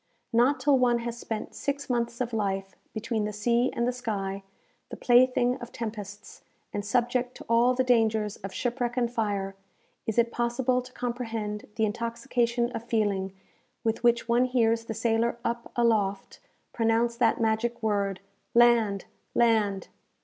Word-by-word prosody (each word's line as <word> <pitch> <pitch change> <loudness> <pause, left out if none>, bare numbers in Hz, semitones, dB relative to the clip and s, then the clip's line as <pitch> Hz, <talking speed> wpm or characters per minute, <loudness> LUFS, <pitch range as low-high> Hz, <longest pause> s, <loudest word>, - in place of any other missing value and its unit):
Not 255 +4 +4
till 275 0 +3
one 245 -1 +3
has 235 0 -5
spent 220 -2 -5
six 285 0 -3
months 235 -1 -1
of 240 -1 -2
life 195 -3 -2 0.2
between 220 -1 -2
the 210 - -2
sea 235 +4 +1
and 235 - -1
the - - +2
sky, 200 -5 -3 0.5
the - - -7
plaything 250 0 +4
of 240 0 -8
tempests, 210 -2 -7 0.3
and 205 - -2
subject 245 +3 0
to - - -11
all 235 +2 +4
the 260 - +2
dangers 220 -4 +2
of 195 -1 -7
shipwreck 245 +3 -2
and 240 -1 +1
fire, 200 -4 -1 0.5
is 220 - -2
it 235 0 +3
possible 240 +2 0
to 250 0 -13
comprehend 225 -4 -4
the 220 - +2
intoxication 235 +2 -1
of 225 - -5
feeling 205 -5 0 0.5
with 225 +1 -1
which 235 -1 +3
one 240 +2 +3
hears 230 -2 +1
the 225 - -5
sailor 230 +1 +1
up 235 0 -3
aloft 210 -5 +1 0.3
pronounce 230 +1 +1
that 235 -2 +3
magic 230 +1 0
word 200 -3 0 0.3
"Land! 230 -5 +4 0.3
land!" 215 -4 +2
235 Hz, 155 wpm, -27 LUFS, 215-240 Hz, 0.5 s, Not